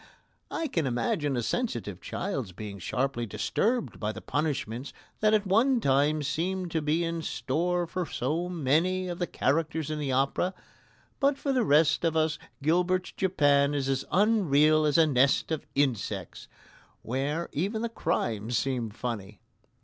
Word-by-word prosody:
I 325 - -2
can 165 - -1
imagine 145 - 0
a 120 - -1
sensitive 115 - -2
child's 135 - -4
being 100 +1 -7
sharply 125 +4 -1
disturbed 235 - -1
by 105 -1 -1
the - - -8
punishments 140 -4 -2 0.3
that 215 0 +4
at 210 -1 +1
one 235 +7 +3
time 145 -1 +2
seem 180 +5 -2
to 160 -1 -1
be 155 +3 +1
in 165 0 -2
store 175 +2 -1
for 175 +1 -3
so 160 +8 -2
many 175 +4 +1
of 175 -1 -5
the 175 - 0
characters 155 +1 0
in 155 - -2
the 140 -3 -2
opera. 135 +8 +1 0.6
But 280 0 +3
for 275 -1 -1
the 255 -2 +2
rest 155 -2 +4
of 160 -1 +1
us 155 -1 +1 0.2
Gilbert's 180 +4 +1
Japan 145 -6 +2
is 135 -2 -1
as 135 -1 0
unreal 155 -7 +4
as 150 0 +3
a 165 - +6
nest 135 +1 +2
of 160 - -3
insects, 135 -8 -1 0.6
where 140 +7 -2
even 205 +9 -2
the - - +1
crimes 115 - -1
seem 125 -2 -1
funny. 105 -3 -5
155 Hz, 155 wpm, -28 LUFS, 135-180 Hz, 0.6 s, a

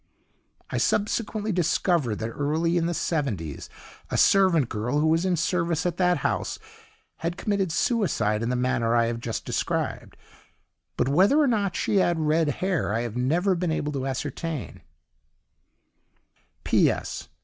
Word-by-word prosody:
I - - -1
subsequently 215 0 0
discovered 170 - +1
that 110 +2 -4
early 155 +6 0
in 170 -1 +1
the 175 - -1
seventies 105 - -3 0.4
a - - -1
servant 185 - +4
girl, 120 +6 -2
who 155 - +2
was 165 +3 +2
in 185 -1 +2
service 170 -1 0
at 175 -1 -1
that 180 -1 +3
house, - - -1 0.6
had 170 +2 -3
committed 195 -3 -1
suicide 145 - +1
in 115 - -1
the 125 - 0
manner 125 -2 +1
I 115 -1 +4
have 115 0 -2
just 115 -1 -4
described, - - -3 0.8
but - - +1
whether 190 - +4
or 300 - +4
not 205 -8 0
she 205 - 0
had 175 -3 +2
RED 155 +1 +2
HAIR 180 - -1
I 115 - 0
have 120 -2 -5
never 165 +10 +1
been 175 -2 -1
able 150 -1 -1
to 135 -2 -3
ascertain. 145 +3 -4
165 Hz, 150 wpm, -25 LUFS, 125-180 Hz, 0.8 s, servant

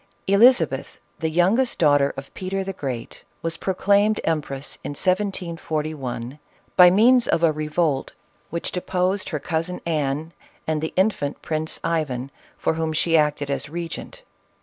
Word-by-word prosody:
Elizabeth, 230 +7 +4 0.2
the 160 - 0
youngest 195 +10 +2
daughter 145 -3 +4
of 135 0 -8
Peter 195 +1 -3
the 195 0 -4
Great, 130 -9 -6 0.2
was 165 0 -1
proclaimed 200 +3 +2
empress 145 -4 -3
in - - -4
1741, 155 - -2 0.4
by 180 -1 +9
means 235 +6 +5
of 165 - +1
a 165 - +5
revolt 155 -2 -1 0.4
which 170 +1 -3
deposed 185 +1 -1
her 155 - -2
cousin 165 +3 -2
Anne 155 0 -1 0.3
and 155 -1 -1
the 160 - -2
infant 185 -7 0
Prince 155 0 -2
Ivan, 140 -5 -1 0.3
for - - 0
whom 160 -1 -2
she 165 +2 +2
acted 150 -2 +2
as 140 +1 -2
regent. 170 +1 -6
165 Hz, 140 wpm, -23 LUFS, 150-185 Hz, 0.4 s, by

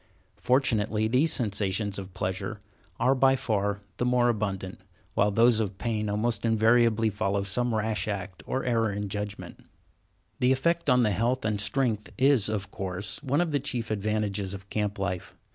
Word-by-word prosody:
Fortunately, 110 -4 +1
the 130 +8 +3
sensations 100 -6 0
of 95 -1 -9
pleasure 95 +3 -3 0.4
are 130 - +4
by 135 0 +4
far 100 -5 -1 0.2
the - - -1
more 125 0 +3
abundant, 100 -4 -3 0.3
while 105 - +3
those 115 +2 +4
of 100 -3 -2
pain 105 0 -2
almost 110 +3 -1
invariably 115 0 +3
follow 100 0 -1
some 120 +5 -1
rash 110 -2 -1
act 95 -3 -4
or 130 - -1
error 115 -3 +1
in 100 0 -4
judgment. 105 +1 -6 0.8
The 125 +1 +3
effect 170 +4 +1
on 125 -1 +5
the 105 - +2
health 115 +5 0
and 105 -2 0
strength 110 -3 0
is, 130 -6 +5
of 100 -2 -3
course, 95 +1 -4
one 145 +2 +1
of 170 -2 -1
the 145 - +1
chief 125 -5 -3
advantages 105 -2 -1
of 95 0 -12
camp 105 -1 -1
life. 95 -2 -4
110 Hz, 165 wpm, -27 LUFS, 100-120 Hz, 0.8 s, on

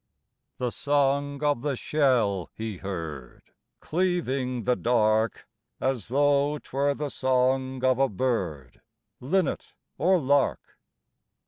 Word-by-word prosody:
The 125 -1 -2
song 140 +1 0
of 145 -5 +1
the 145 0 -1
shell 120 - +1
he 110 -3 -5
heard 80 -9 -6 0.4
Cleaving 140 -9 -1
the 125 +2 +2
dark, 110 -2 +1 0.3
As 130 -6 -1
though 145 +3 +2
'twere 140 0 -1
the 150 0 -3
song 130 0 0
of 130 0 +3
a 135 0 +3
bird, 90 - -3 0.4
Linnet 165 +5 -1 0.2
or 185 +4 +4
lark. 140 -2 0
130 Hz, 110 wpm, -26 LUFS, 115-145 Hz, 0.4 s, or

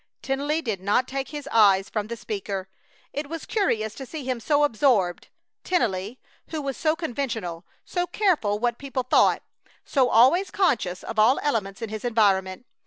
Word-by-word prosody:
Tennelly 290 +4 -1
did 215 -7 -3
not 210 +6 +1
take 270 0 -3
his 295 -1 -7
eyes 200 -3 +5
from 210 -1 -3
the 235 +1 -5
speaker. 200 -4 -4 0.5
It 290 0 -4
was 330 0 -6
curious 220 - 0
to 265 +4 -8
see 310 0 -6
him 255 -2 -2
so 290 +5 +2
absorbed, 225 -9 +2 0.4
Tennelly, 225 - -1 0.3
who 320 - -4
was 275 -2 -3
so 310 0 +1
conventional, 230 - -4 0.2
so 355 -1 -2
careful 345 - +1
what 240 +1 -1
people 270 -2 -3
thought, 250 - +3 0.4
so 260 -3 +2
always 335 - +5
conscious 240 - 0
of 220 - -4
all 225 +6 +5
elements 215 -8 -1
in 225 - -4
his 215 0 -6
environment. 200 -3 +1
240 Hz, 170 wpm, -25 LUFS, 205-290 Hz, 0.5 s, eyes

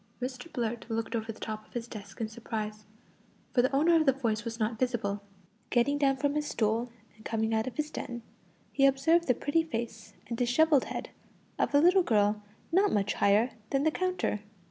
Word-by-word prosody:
Mr 255 +5 -5
Blurt 235 -1 -3
looked 225 +1 -2
over 225 0 -2
the 220 - -13
top 215 -1 -5
of - - -25
his 240 -1 -4
desk 200 -4 -10
in 225 - -1
surprise, 215 -1 -5 0.7
for 245 - +5
the 260 +2 +1
owner 325 +5 +5
of 315 -2 +3
the - - +8
voice 230 -5 -1
was 230 +1 -5
not 220 0 -1
visible. 225 -5 -1 0.5
Getting 285 +4 +2
down 270 -2 +3
from 285 +1 0
his 300 0 -1
stool, 230 +2 0 0.2
and 220 - -18
coming 220 0 -1
out 220 +1 +1
of 255 - -6
his 305 0 -2
den, 240 -1 -5 0.5
he 275 -1 +5
observed 320 +6 +3
the 250 - +4
pretty 290 +7 +1
face 230 -7 -5
and 235 - -3
dishevelled 275 +4 +4
head - - -5 0.5
of - - +1
a - - +7
little 360 +5 +6
girl 210 - +2 0.3
not 390 +4 +4
much 205 0 +1
higher 210 +5 +3 0.2
than 275 0 +1
the 315 - +3
counter. 365 -11 -1
240 Hz, 200 wpm, -30 LUFS, 220-285 Hz, 0.7 s, the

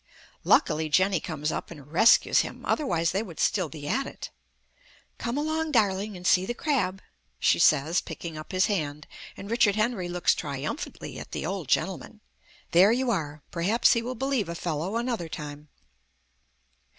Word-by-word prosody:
Luckily 155 0 +3
Jenny 185 +3 +3
comes 155 -2 -3
up - - -4
and 145 -3 -12
rescues 220 +8 +5
him, - - -3
otherwise 170 - +1
they 195 - 0
would 185 -8 -9
still 185 -8 +1
be 145 0 -8
at - - 0
it. - - -8 0.9
"Come 235 +3 -2
along, 315 +1 -1
darling, 205 -3 +1
and 180 - -11
see 180 0 +4
the 240 +5 -3
crab," 230 -12 -1 0.4
she - - +3
says, 160 +1 +4
picking 165 -2 -7
up 155 0 -8
his 185 0 +3
hand; 150 -7 -2 0.3
and 200 - -8
Richard 225 -4 +3
Henry 215 -5 0
looks 175 0 +2
triumphantly 145 - -5
at - - -10
the - - -3
old - - -3
gentleman. - - -1 0.5
There 185 +5 +6
you 250 +1 +1
are. 150 -7 -3
Perhaps 190 +8 +3
he 235 - 0
will 250 +2 -4
believe 260 -6 -1
a 170 - -4
fellow 170 +4 -3
another 235 -8 -2
time. 150 -1 -8
185 Hz, 165 wpm, -27 LUFS, 160-230 Hz, 0.9 s, There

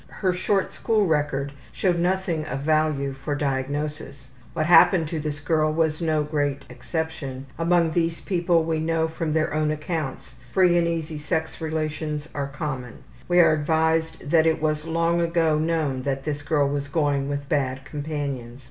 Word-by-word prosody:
Her 185 -3 -1
short 190 +2 0
school 215 -2 +1
record 145 -4 0 0.2
showed 175 - +1
nothing 175 -2 0
of 135 - -3
value 155 -2 +1
for 135 +2 -4
diagnosis. 140 0 -3 0.2
What 155 -2 0
happened 170 0 +6
to 160 - -2
this 150 -1 -4
girl 155 0 +1
was 155 0 0
no 155 -2 +1
great 145 -2 -1
exception; 140 -1 -4
among 170 -1 +3
these 165 0 0
people, 175 -3 +1
we 160 -1 -1
know 160 0 +1
from 160 0 -3
their 155 -1 +1
own 155 0 +1
accounts, 155 -2 -4 0.2
free 180 -2 +5
and 170 -1 +3
easy 160 -2 -3
sex 160 +2 -2
relationships 155 -1 -3
are 140 -1 -2
common. 135 -4 -5 0.2
We 175 0 +4
are 165 - +5
advised 160 +1 0
that 165 -1 +5
it 160 - +2
was 155 0 -1
long 165 +1 +1
ago 165 -2 +2
known 155 -5 0
that 135 0 -2
this 145 -1 -3
girl 145 -1 +1
was 140 0 -2
going 145 -2 0
with 145 0 -3
bad 135 -2 -1
companions. 140 -5 -4
155 Hz, 165 wpm, -24 LUFS, 145-165 Hz, 0.2 s, happened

